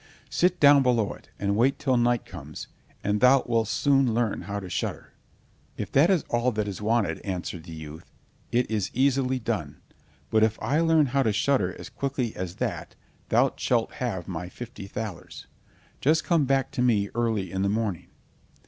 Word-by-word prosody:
Sit 180 Hz, 0 st, +2 dB
down 145 Hz, -1 st, +7 dB
below 120 Hz, -5 st, +1 dB
it, -, -, -17 dB
and 100 Hz, 0 st, 0 dB
wait 130 Hz, +5 st, +3 dB
till 135 Hz, -3 st, +1 dB
night 120 Hz, -1 st, +2 dB
comes, -, -, -9 dB, 0.4 s
and 105 Hz, +1 st, 0 dB
thou 130 Hz, +1 st, +6 dB
wilt 115 Hz, -2 st, +1 dB
soon 135 Hz, -3 st, +2 dB
learn 115 Hz, -3 st, 0 dB
how 100 Hz, 0 st, -4 dB
to 95 Hz, -, -8 dB
shudder." -, -, -4 dB, 0.6 s
"If -, -, -5 dB
that 145 Hz, +6 st, +5 dB
is 185 Hz, -6 st, +3 dB
all 120 Hz, +1 st, +1 dB
that 105 Hz, -1 st, -1 dB
is 100 Hz, 0 st, -5 dB
wanted," 110 Hz, 0 st, +1 dB
answered 90 Hz, -3 st, -5 dB
the 85 Hz, -, -10 dB
youth, 80 Hz, +1 st, -10 dB, 0.4 s
"it 120 Hz, 0 st, +1 dB
is 105 Hz, -4 st, 0 dB
easily 130 Hz, 0 st, +2 dB
done; 120 Hz, -, -3 dB, 0.5 s
but 110 Hz, -, +4 dB
if 110 Hz, 0 st, +2 dB
I 150 Hz, +3 st, 0 dB
learn 165 Hz, -2 st, +4 dB
how 140 Hz, -, +3 dB
to 115 Hz, -5 st, +2 dB
shudder 130 Hz, +6 st, +1 dB
as -, -, -9 dB
quickly 130 Hz, -4 st, -3 dB
as 90 Hz, -1 st, -5 dB
that, -, -, -4 dB, 0.3 s
thou -, -, +3 dB
shalt -, -, +1 dB
have 90 Hz, -2 st, -2 dB
my 90 Hz, -1 st, -5 dB
fifty 115 Hz, -1 st, -9 dB
thalers. 105 Hz, -4 st, -7 dB, 0.5 s
Just 160 Hz, +4 st, +2 dB
come 165 Hz, -5 st, +2 dB
back 135 Hz, 0 st, +1 dB
to 135 Hz, -, -2 dB
me 105 Hz, -5 st, +2 dB
early 110 Hz, -6 st, -1 dB
in 95 Hz, -, -2 dB
the 100 Hz, -, +1 dB
morning." 105 Hz, -5 st, -2 dB
115 Hz, 185 wpm, -26 LUFS, 100-135 Hz, 0.6 s, down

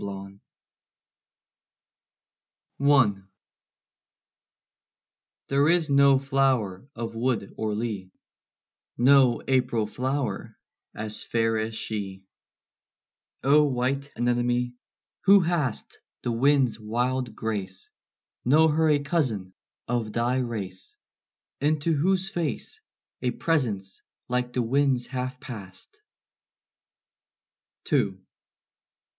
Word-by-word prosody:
KINSHIP 100 Hz, 0 st, -7 dB, 2.5 s
I. 125 Hz, -9 st, +4 dB, 2.3 s
There 140 Hz, +2 st, +3 dB
is 165 Hz, -3 st, +2 dB
no 140 Hz, -1 st, +6 dB
flower 130 Hz, -5 st, 0 dB
of 115 Hz, -1 st, -5 dB
wood 115 Hz, -3 st, -1 dB
or 110 Hz, -1 st, -2 dB
lea, 105 Hz, -4 st, -3 dB, 0.9 s
No 130 Hz, -1 st, +5 dB
April 125 Hz, -4 st, +1 dB
flower, 130 Hz, -1 st, -3 dB, 0.4 s
as 110 Hz, 0 st, -4 dB
fair 115 Hz, -1 st, +1 dB
as 110 Hz, +1 st, -3 dB
she: 100 Hz, -4 st, -4 dB, 1.2 s
O 145 Hz, +3 st, +6 dB
white 135 Hz, +1 st, -1 dB
anemone, 120 Hz, +1 st, 0 dB, 0.5 s
who 200 Hz, +1 st, +8 dB
hast 165 Hz, -9 st, -2 dB, 0.2 s
The 120 Hz, -, -1 dB
wind's 130 Hz, -2 st, +2 dB
wild 120 Hz, +3 st, -1 dB
grace, 95 Hz, -4 st, -4 dB, 0.5 s
Know 155 Hz, +5 st, +5 dB
her 160 Hz, +1 st, +2 dB
a 150 Hz, -, +5 dB
cousin 120 Hz, -, -1 dB, 0.3 s
of 115 Hz, -3 st, -2 dB
thy 120 Hz, +2 st, +1 dB
race, 105 Hz, -7 st, -5 dB, 0.6 s
Into 155 Hz, +3 st, +1 dB
whose 185 Hz, +5 st, +1 dB
face 170 Hz, -8 st, -3 dB, 0.4 s
A 125 Hz, -, +1 dB
presence 115 Hz, -, -1 dB, 0.3 s
like 125 Hz, 0 st, -1 dB
the 125 Hz, -, +1 dB
wind's 130 Hz, 0 st, +2 dB
hath 130 Hz, -1 st, -4 dB
passed. 125 Hz, -, -9 dB, 1.9 s
II. -, -, +2 dB
125 Hz, 90 wpm, -26 LUFS, 110-140 Hz, 2.5 s, who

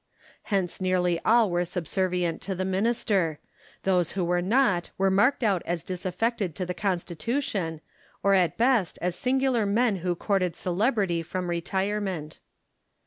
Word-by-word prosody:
Hence 190 Hz, -3 st, -1 dB
nearly 180 Hz, -2 st, +1 dB
all 225 Hz, -3 st, +4 dB
were 175 Hz, 0 st, +1 dB
subservient 180 Hz, 0 st, -1 dB
to 190 Hz, +2 st, -3 dB
the 185 Hz, +1 st, -2 dB
minister: 190 Hz, -4 st, +1 dB, 0.5 s
those 180 Hz, -3 st, +1 dB
who 185 Hz, -2 st, -1 dB
were 175 Hz, +1 st, +1 dB
not 195 Hz, -3 st, +2 dB
were 195 Hz, 0 st, +2 dB
marked 240 Hz, +8 st, +3 dB
out 195 Hz, -5 st, +2 dB
as 170 Hz, 0 st, -2 dB
disaffected 185 Hz, 0 st, -2 dB
to 185 Hz, -, -3 dB
the 180 Hz, -, -3 dB
Constitution, 180 Hz, -, -2 dB, 0.4 s
or 200 Hz, -, +4 dB
at 180 Hz, -4 st, +2 dB
best 235 Hz, -7 st, +2 dB
as 180 Hz, 0 st, -1 dB
singular 255 Hz, -4 st, +1 dB
men 220 Hz, 0 st, +2 dB
who 175 Hz, 0 st, -1 dB
courted 185 Hz, -2 st, 0 dB
celebrity 190 Hz, -2 st, 0 dB
from 180 Hz, +1 st, -4 dB
retirement. 190 Hz, -2 st, -2 dB
185 Hz, 140 wpm, -26 LUFS, 175-210 Hz, 0.5 s, all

